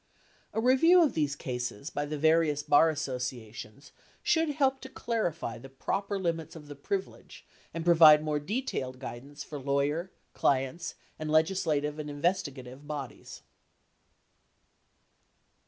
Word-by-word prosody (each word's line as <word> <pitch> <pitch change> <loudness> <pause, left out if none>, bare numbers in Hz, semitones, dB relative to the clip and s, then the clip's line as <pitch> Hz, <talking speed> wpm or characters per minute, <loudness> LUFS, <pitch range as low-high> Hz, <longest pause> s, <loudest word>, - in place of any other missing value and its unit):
A - - -2
review 295 +9 +6
of 295 - +1
these 145 -3 0
cases 125 0 -5
by 145 0 -2
the 150 +1 -4
various 155 -1 +3
bar 150 +2 +5
associations 125 -4 -5 0.3
should 325 -1 +2
help 270 -2 +1
to 265 - -9
clarify 175 - -3
the 135 +3 -11
proper 195 +9 -2
limits 165 -4 -3
of 150 -2 -11
the 145 - -8
privilege, 190 +7 -5 0.3
and 165 0 -5
provide 160 -3 +8
more 150 -1 0
detailed 145 - -3
guidance 140 +3 -8
for 145 0 -7
lawyer, 140 +6 0 0.2
clients, 135 +4 0 0.2
and 155 0 -4
legislative 155 -2 +1
and 150 -1 -5
investigative 145 -4 -3
bodies. 145 -4 -7
150 Hz, 125 wpm, -29 LUFS, 140-175 Hz, 0.3 s, provide